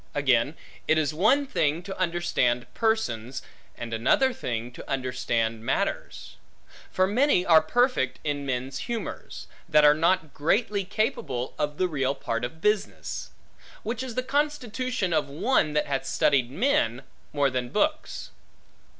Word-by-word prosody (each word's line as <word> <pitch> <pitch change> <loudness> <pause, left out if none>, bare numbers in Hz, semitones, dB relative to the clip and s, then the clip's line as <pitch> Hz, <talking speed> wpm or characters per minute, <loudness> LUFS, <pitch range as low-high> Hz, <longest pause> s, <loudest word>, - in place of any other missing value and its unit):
Again, 135 0 +2 0.3
it 155 - +4
is 155 -1 +1
one 220 - +3
thing 160 - 0
to 195 +1 -6
understand 170 -9 0
persons, 135 - -1 0.3
and 115 -1 -6
another 250 - +3
thing 120 - -4
to - - -11
understand 120 -4 -1
matters; - - -2 0.5
for 185 - +2
many 210 -2 +3
are 160 -2 +7
perfect 240 - +1
in 145 -1 -2
men's 130 0 -3
humors, 235 -2 -5 0.2
that 150 0 +6
are 150 - +8
not 165 -1 +1
greatly 200 +6 +1
capable 135 - -2
of 150 0 -1
the 185 - +2
real 140 -4 -1
part 115 -3 -3
of 140 +7 -5
business; 210 +1 -1 0.5
which 230 +2 -3
is 255 -3 -5
the 255 - 0
constitution 255 - -1
of 150 -3 +1
one 155 - +1
that 150 - +1
hath 135 -1 -2
studied 130 -4 +2
men, 135 - +1 0.3
more 140 -2 +2
than 125 -1 -2
books. 305 - -1
155 Hz, 140 wpm, -26 LUFS, 130-215 Hz, 0.5 s, are